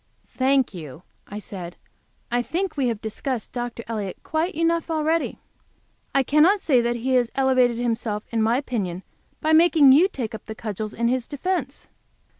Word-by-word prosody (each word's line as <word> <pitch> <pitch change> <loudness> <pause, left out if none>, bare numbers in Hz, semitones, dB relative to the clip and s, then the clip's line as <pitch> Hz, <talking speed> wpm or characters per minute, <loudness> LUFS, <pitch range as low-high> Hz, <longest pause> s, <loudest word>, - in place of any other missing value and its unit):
"Thank 265 -2 +2
you," 160 -2 -9 0.2
I 205 - -7
said, 185 -5 -7 0.6
"I 245 0 +2
think 360 +9 -2
we 275 -4 +1
have 225 -3 -2
discussed 220 +2 -4
Dr. 240 -1 -4
Elliott 210 -5 -4
quite 320 +5 -1
enough 335 +1 +1
already. 320 +1 0 0.8
I 275 - +4
cannot 310 - +4
say 265 -9 +3
that 240 0 0
he 255 +3 -1
has 245 -2 +3
elevated 255 -3 +3
himself 230 -3 -2
in 230 -1 0
my 225 +3 +3
opinion 195 -10 -3 0.4
by 315 +1 +2
making 320 -4 +6
you 315 +8 +6
take 250 - -5
up 220 - -9
the 220 - -6
cudgels 215 -1 -5
in 235 +1 0
his 250 0 0
defence." 295 -2 -3
245 Hz, 170 wpm, -23 LUFS, 220-300 Hz, 0.8 s, making